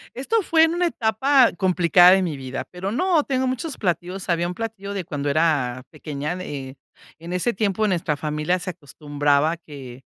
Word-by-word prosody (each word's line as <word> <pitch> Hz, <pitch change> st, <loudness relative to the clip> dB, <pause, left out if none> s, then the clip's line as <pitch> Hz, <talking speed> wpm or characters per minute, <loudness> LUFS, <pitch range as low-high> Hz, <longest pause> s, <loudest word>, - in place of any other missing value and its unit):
esto 410 Hz, -, 0 dB
fue 325 Hz, -3 st, +4 dB
en 325 Hz, +1 st, +1 dB
una 355 Hz, 0 st, +1 dB
etapa 265 Hz, -1 st, +3 dB
complicada 180 Hz, -1 st, +5 dB
de 190 Hz, 0 st, +4 dB
mi 165 Hz, -5 st, -2 dB
vida, 130 Hz, -1 st, -6 dB
pero 185 Hz, +2 st, -5 dB
no, 345 Hz, +4 st, +2 dB
tengo 260 Hz, -1 st, -1 dB
muchos 260 Hz, +4 st, -3 dB
platillos. 185 Hz, 0 st, -3 dB
Había 170 Hz, 0 st, +1 dB
un 180 Hz, -, -5 dB
platillo 200 Hz, -1 st, -6 dB
de 190 Hz, -3 st, -3 dB
cuando 145 Hz, -4 st, -4 dB
era 140 Hz, -5 st, +1 dB
pequeña, 150 Hz, +1 st, -5 dB
eh, 140 Hz, -6 st, -7 dB, 0.4 s
en 170 Hz, +2 st, -8 dB
ese 180 Hz, +7 st, 0 dB
tiempo 210 Hz, +1 st, 0 dB
nuestra 170 Hz, -6 st, -1 dB
familia 150 Hz, +4 st, -1 dB
se 185 Hz, +1 st, -5 dB
acostumbraba 145 Hz, -1 st, 0 dB
a -, -, -4 dB
que 135 Hz, -6 st, -11 dB
180 Hz, 185 wpm, -22 LUFS, 150-220 Hz, 0.4 s, complicada